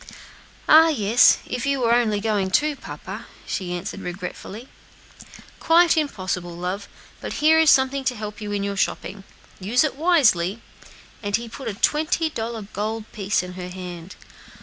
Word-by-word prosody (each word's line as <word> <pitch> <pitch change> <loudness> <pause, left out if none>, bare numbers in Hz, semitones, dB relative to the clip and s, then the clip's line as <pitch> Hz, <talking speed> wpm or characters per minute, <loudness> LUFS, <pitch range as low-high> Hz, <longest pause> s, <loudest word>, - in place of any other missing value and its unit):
"Ah! 320 +1 +8
yes, 235 -6 +4
if 250 -1 -4
you 275 -1 +1
were 235 -2 +2
only 225 -4 +2
going 205 -3 0
too, 295 +9 +2
papa," - - -9 0.2
she 185 -3 -4
answered 180 +3 -5
regretfully. 190 +6 -7 0.9
"Quite 335 +1 +4
impossible, 185 - -2
my 180 +2 -3
pet; 200 - -13 0.3
but - - -6
here 315 +2 +4
is 320 -1 +5
something 265 0 +3
to 250 - 0
help 210 -1 -7
you 210 -1 -5
in 200 -1 -1
your 200 0 -3
shopping; 195 0 -2 0.3
use 220 +9 +2
it 305 - -1
wisely;" 235 - +2 0.6
and 205 -2 -1
he 235 +1 -3
put 235 +3 -8
a 210 - -3
twenty 315 +6 +1
dollar 225 -3 -4
gold 215 +2 -5
piece 200 -2 -1
in 180 0 -8
her 180 0 -7
hand. 180 -1 -8
215 Hz, 165 wpm, -23 LUFS, 190-270 Hz, 0.9 s, Ah